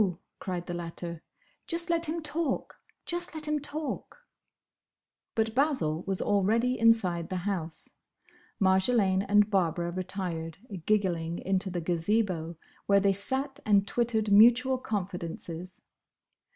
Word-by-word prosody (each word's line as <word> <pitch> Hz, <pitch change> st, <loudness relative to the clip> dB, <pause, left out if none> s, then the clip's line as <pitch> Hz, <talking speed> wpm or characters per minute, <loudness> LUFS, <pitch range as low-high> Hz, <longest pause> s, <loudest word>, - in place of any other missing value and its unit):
cried 180 Hz, -2 st, -4 dB
the 175 Hz, -, -5 dB
latter, 170 Hz, -1 st, -5 dB, 0.5 s
"just 340 Hz, +1 st, +1 dB
let 335 Hz, -1 st, +1 dB
him 325 Hz, +1 st, -3 dB
talk! 300 Hz, -2 st, -2 dB, 0.3 s
Just 345 Hz, -1 st, +1 dB
let 305 Hz, -1 st, +1 dB
him 300 Hz, 0 st, +1 dB
talk!" 305 Hz, -, -6 dB, 1.1 s
But 225 Hz, 0 st, +1 dB
Basil 255 Hz, -, +1 dB
was 195 Hz, -1 st, 0 dB
already 220 Hz, +5 st, +2 dB
inside 200 Hz, -7 st, +3 dB
the 185 Hz, -, -3 dB
house. 170 Hz, -5 st, -4 dB, 0.6 s
Marjolaine 190 Hz, 0 st, +3 dB
and 205 Hz, +1 st, +4 dB
Barbara 175 Hz, -3 st, +1 dB
retired, 180 Hz, -3 st, -4 dB, 0.3 s
giggling, 175 Hz, -5 st, +1 dB
into 190 Hz, +1 st, -1 dB
the 175 Hz, -1 st, -3 dB
Gazebo, 170 Hz, -1 st, 0 dB, 0.3 s
where 200 Hz, 0 st, +5 dB
they 195 Hz, 0 st, +3 dB
sat 270 Hz, +8 st, -3 dB
and 200 Hz, -2 st, +3 dB
twittered 220 Hz, -2 st, 0 dB
mutual 240 Hz, +5 st, +6 dB
confidences. 180 Hz, -4 st, -5 dB
200 Hz, 120 wpm, -29 LUFS, 175-250 Hz, 1.1 s, mutual